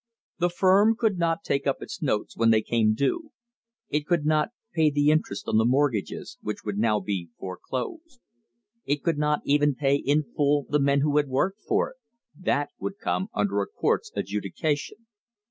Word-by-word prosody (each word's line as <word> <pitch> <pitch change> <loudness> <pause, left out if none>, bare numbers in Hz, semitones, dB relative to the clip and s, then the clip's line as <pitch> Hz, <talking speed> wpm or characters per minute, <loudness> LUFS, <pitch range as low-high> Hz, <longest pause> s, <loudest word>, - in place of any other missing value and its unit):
The 175 0 +2
firm 195 +5 +4
could 220 -5 0
not 170 +3 0
take 140 0 -1
up 135 - +1
its - - -8
notes 120 -9 -1
when 115 0 +3
they 110 -1 +4
came 110 -2 +2
due; 300 - -1 0.6
it 150 -4 -2
could 170 -4 +1
not 155 +2 +2 0.2
pay 160 -3 +4
the 145 0 +3
interest 155 -10 -1
on - - +2
the - - +4
mortgages, 130 -3 0
which 105 -1 -5
would 105 -1 -2
now 110 -1 +2
be 95 -3 -4
foreclosed; 245 - -6 0.6
it 145 0 -1
could 165 -4 0
not 150 0 +1
even 145 0 +3
pay 140 +1 +2
in 145 +2 +1
full 145 +1 +1
the 150 - +1
men 140 0 +3
who 145 0 +2
had 145 -1 +3
worked 190 +11 -1
for - - +1
it - - -20 0.4
that 145 -5 0
would 200 - -4
come 190 -1 -1
under 100 -1 +1
a 100 - -3
court's - - -1
adjudication. 145 - -3
145 Hz, 180 wpm, -26 LUFS, 115-165 Hz, 0.6 s, firm